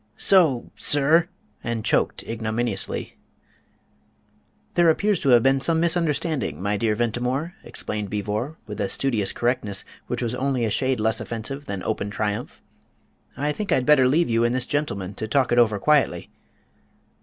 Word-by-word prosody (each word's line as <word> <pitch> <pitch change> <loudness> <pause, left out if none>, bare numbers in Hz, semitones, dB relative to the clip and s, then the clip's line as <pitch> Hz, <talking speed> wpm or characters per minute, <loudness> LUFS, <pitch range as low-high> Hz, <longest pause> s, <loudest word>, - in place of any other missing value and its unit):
"So, 165 -11 +3
sir! 155 +5 +3 0.2
" - - -38
and 115 -2 -3
choked - - +1
ignominiously. 110 -2 -3 1.5
"There 170 -1 +4
appears 200 +3 +2
to 140 - 0
have 120 -2 +6
been 135 0 +3
some 165 +3 +2
misunderstanding, 165 -3 0
my 100 +2 -1
dear 110 +1 0
Ventimore," 125 +8 -1
explained 105 -2 -4
Beevor, 105 +8 -3
with 105 -1 -6
a 100 - -1
studious 115 -8 +1
correctness 120 -5 -1 0.2
which - - -3
was 120 0 -1
only 130 -1 0
a 110 - -1
shade 130 0 0
less 110 +1 +1
offensive 135 +5 -5
than 100 -2 -4
open 100 - -2
triumph. 105 +3 -4 0.7
"I 145 +1 0
think 205 +7 -4
I'd 130 - +2
better 135 -3 +5
leave 160 +6 +2
you 115 0 +1
and 120 +1 +1
this 130 -1 +1
gentleman 100 -11 -2
to 110 - -5
talk 130 +2 +1
it 120 - +4
over 110 -3 +3
quietly." 135 - +1
125 Hz, 160 wpm, -23 LUFS, 110-145 Hz, 1.5 s, have